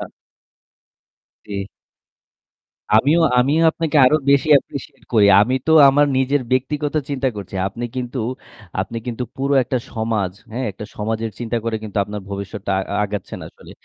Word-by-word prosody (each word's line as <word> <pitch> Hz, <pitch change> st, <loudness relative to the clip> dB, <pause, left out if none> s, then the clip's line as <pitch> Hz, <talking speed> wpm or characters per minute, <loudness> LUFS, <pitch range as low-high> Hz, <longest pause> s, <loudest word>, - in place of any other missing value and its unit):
হ্যাঁ। -, -, -6 dB, 1.4 s
জি। 100 Hz, -1 st, -5 dB, 1.3 s
আমিও 145 Hz, +9 st, +4 dB, 0.2 s
আমিও 140 Hz, +6 st, +3 dB
আপনাকে 160 Hz, -2 st, -2 dB
আরো 140 Hz, +4 st, +5 dB
বেশি 140 Hz, +2 st, +3 dB
appreciate 135 Hz, 0 st, -10 dB
করি। 105 Hz, -3 st, +5 dB
আমি 125 Hz, +5 st, +2 dB
তো 160 Hz, -, +1 dB, 0.2 s
আমার 145 Hz, +2 st, +4 dB
নিজের 130 Hz, +2 st, +2 dB
ব্যক্তিগত 145 Hz, +3 st, -1 dB, 0.2 s
চিন্তা 135 Hz, -1 st, 0 dB
করছি। 100 Hz, -1 st, -8 dB
আপনি 120 Hz, +4 st, -6 dB
কিন্তু 125 Hz, +1 st, -4 dB, 0.6 s
আপনি 105 Hz, +5 st, -4 dB
কিন্তু 120 Hz, +1 st, -3 dB
পুরো 140 Hz, +1 st, 0 dB
একটা 130 Hz, +1 st, -2 dB, 0.2 s
সমাজ 110 Hz, -5 st, -1 dB, 0.2 s
হ্যাঁ? 125 Hz, +3 st, -3 dB
একটা 100 Hz, +2 st, -9 dB
সমাজের 110 Hz, +1 st, -2 dB
চিন্তা 120 Hz, 0 st, -3 dB
করে 115 Hz, -1 st, -1 dB
কিন্তু 105 Hz, -1 st, -8 dB
আপনার 105 Hz, 0 st, -6 dB
ভবিষ্যতটা 100 Hz, 0 st, -5 dB
আ -, -, +1 dB, 0.2 s
আগাচ্ছেন 100 Hz, -1 st, -5 dB
আসলে। -, -, -16 dB
120 Hz, 145 wpm, -20 LUFS, 105-140 Hz, 1.4 s, আরো